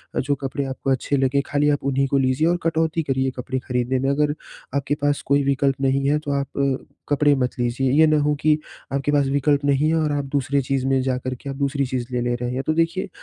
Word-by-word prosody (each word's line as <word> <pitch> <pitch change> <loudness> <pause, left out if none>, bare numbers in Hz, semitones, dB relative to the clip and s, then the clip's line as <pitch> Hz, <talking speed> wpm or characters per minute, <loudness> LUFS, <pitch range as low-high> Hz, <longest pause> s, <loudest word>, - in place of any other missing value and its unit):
अ, - - +1
जो 140 +2 0
कपड़े 135 +1 -2
आपको 135 0 -4
अच्छे 135 +2 0
लगे 135 +1 +2
खाली 145 +1 +3
आप 145 -1 0
उन्हीं 135 0 +1
को 140 - +1
लीजिए 135 +4 +2
और 175 +1 +2
कटौती 160 0 +1
करिए 130 -2 0
कपड़े 130 +1 -4
खरीदने 125 0 -1
में, 135 - 0
अगर 145 +1 +1 0.4
आपके 140 +1 0
पास 145 0 +1
कोई 140 +1 +2
विकल्प 140 0 +1
नहीं 135 0 +1
है, 150 - +3
तो 150 -2 -4
आप 140 -1 -1 0.6
कपड़े 145 0 +4
मत 125 0 -2
लीजिए, 125 +2 0
ये 155 +3 +5
ना 155 0 +3
हो 150 0 +2
कि 155 0 +4 0.4
आपके 140 +1 0
पास 145 -2 +2
विकल्प 140 +1 +1
नहीं 145 +2 +2
है 160 - +2
और 155 -2 +1
आप 145 -1 -1
दूसरी 140 0 +1
चीज़ 135 0 -1
में 135 -1 +2
जाकर 130 0 -2
के 140 +3 -9
आप, 135 - -4
दूसरी 140 0 0
चीज़ 125 -1 -3
ले 125 - -1
ले 120 0 0
रहे 120 0 -3
हैं। 130 +1 -2
तो 155 - +3
देखिए, 165 +4 0
140 Hz, 245 wpm, -22 LUFS, 130-145 Hz, 0.6 s, ये